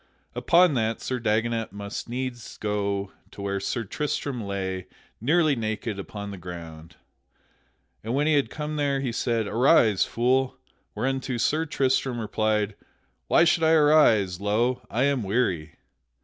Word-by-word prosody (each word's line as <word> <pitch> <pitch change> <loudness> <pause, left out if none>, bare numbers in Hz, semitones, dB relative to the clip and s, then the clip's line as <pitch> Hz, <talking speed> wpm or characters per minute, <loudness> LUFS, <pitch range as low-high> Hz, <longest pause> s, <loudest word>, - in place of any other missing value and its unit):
Upon 175 -1 +4
that 115 -3 0
Sir 130 -1 -3
Dagonet 115 0 0
must 100 +3 -6
needs 125 -1 -5
go 100 -2 -2 0.2
to - - -15
where 100 0 -1
Sir 115 +4 -2
Tristram 140 +2 -3
lay, 95 -2 -4 0.3
nearly 155 +3 +3
naked, 110 -2 -3
upon 100 +1 -6
the 100 - -8
ground. 85 -2 -9 1.1
And 115 +4 -2
when 145 +2 +2
he 155 - +3
had 145 -2 +2
come 150 0 -4
there 140 -2 +1
he 130 -3 -2
said, 115 -1 0
"Arise, 115 - +4
fool." 130 +2 +1 0.4
Whereunto 130 +2 -2
Sir 155 +7 +1
Tristram 130 -3 0
replied: 110 -1 0 0.5
"Why - - +5
should 170 0 +3
I 160 0 +4
arise? 145 - +4
Lo! 115 +5 +1
I 120 +4 0
am 140 -2 +2
weary." 95 -7 -1
115 Hz, 145 wpm, -25 LUFS, 100-135 Hz, 1.1 s, Why